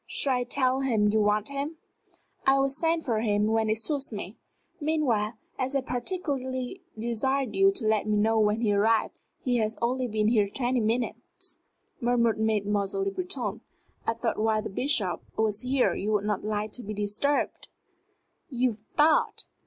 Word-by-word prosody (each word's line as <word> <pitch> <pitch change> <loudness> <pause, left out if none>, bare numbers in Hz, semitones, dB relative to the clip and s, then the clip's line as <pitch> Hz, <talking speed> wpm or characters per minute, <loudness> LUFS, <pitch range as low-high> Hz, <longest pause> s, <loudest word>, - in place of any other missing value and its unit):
Shall 265 -3 +2
I 245 - -1
tell 255 +1 +1
him 225 -6 +2
you 215 +1 +3
want 210 +3 +1
him?" 280 +3 -4 0.7
"I 270 0 +6
will 275 0 +2
send 325 +3 0
for 230 -5 +1
him 210 -2 +1
when 220 0 +1
it 215 - +2
suits 275 +4 -1
me. 205 -1 -6 0.4
Meanwhile, 275 -9 +1 0.3
as 265 +1 -1
I 275 - +2
particularly 260 +1 -3 0.2
desired 240 +2 0
you 195 0 +5
to 220 - -2
let 215 -1 +2
me 210 -1 +2
know 220 +2 +3
when 210 +1 +2
he 210 -3 +2
arrived 220 +2 +2 0.2
" - - -44
"He 245 -2 +2
has 220 -1 -1
only 250 +2 0
been 215 -1 +1
here 210 -4 +3
twenty 250 +3 0
minutes," 230 +2 -3 0.4
murmured 235 -2 +2
Mademoiselle 205 -2 0
Le 195 - 0
Breton. 365 - -3 0.5
"I 225 - +1
thought 230 -1 -2
while 215 0 +1
the - - -5
Bishop 200 - +1 0.2
was 215 -1 +1
here 255 0 +2
you 210 +2 -2
would 205 -1 +1
not 210 -2 -1
like 210 0 -2
to 250 - -8
be 215 +1 -5
disturbed 210 +8 -1 0.5
" - - -47
"You 250 -4 0 0.2
thought!" 305 +1 +3
225 Hz, 175 wpm, -27 LUFS, 210-260 Hz, 0.7 s, I